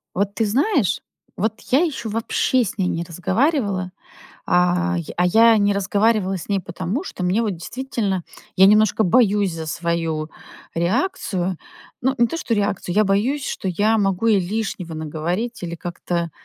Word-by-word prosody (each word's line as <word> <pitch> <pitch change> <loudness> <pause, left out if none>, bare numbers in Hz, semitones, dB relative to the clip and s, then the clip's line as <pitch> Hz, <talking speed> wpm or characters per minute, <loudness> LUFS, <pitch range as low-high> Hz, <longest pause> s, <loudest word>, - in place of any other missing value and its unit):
Вот 200 +2 -1
ты 225 - +1
знаешь, 260 - +1 0.4
вот 220 +3 -2
я 265 - +5
ещё 275 -9 -2
вообще 230 +3 +1
с 205 - -5
ней 185 -3 +1
не 170 -1 -1
разговаривала, 190 - 0 0.5
а 180 +1 +2
я 170 - -5
а 180 - +3
я 225 +4 +6
не 200 0 +3
разговаривала 200 0 +1
с 175 - -9
ней 200 -1 +1
потому, 185 - -4
что 185 - -6
мне 190 +6 +2
вот 215 - 0
действительно 205 -2 -3 0.3
я 190 - +7
немножко 215 +1 +4
боюсь 205 -2 +3
за 160 -1 -6
свою 165 -2 -2 0.4
реакцию. 185 - -1 0.4
Ну, 265 +2 +1
не 240 - +5
то 330 - -4
что 230 -8 -1
реакцию, 200 -3 -1
я 215 - +5
боюсь, 225 +9 0
что 190 - -4
я 210 +5 +2
могу 195 +1 0
ей 215 -3 +5
лишнего 185 -3 -3
наговорить 170 - -3
или 170 -1 -4
как-то, 170 -1 -3
195 Hz, 165 wpm, -21 LUFS, 175-225 Hz, 0.5 s, я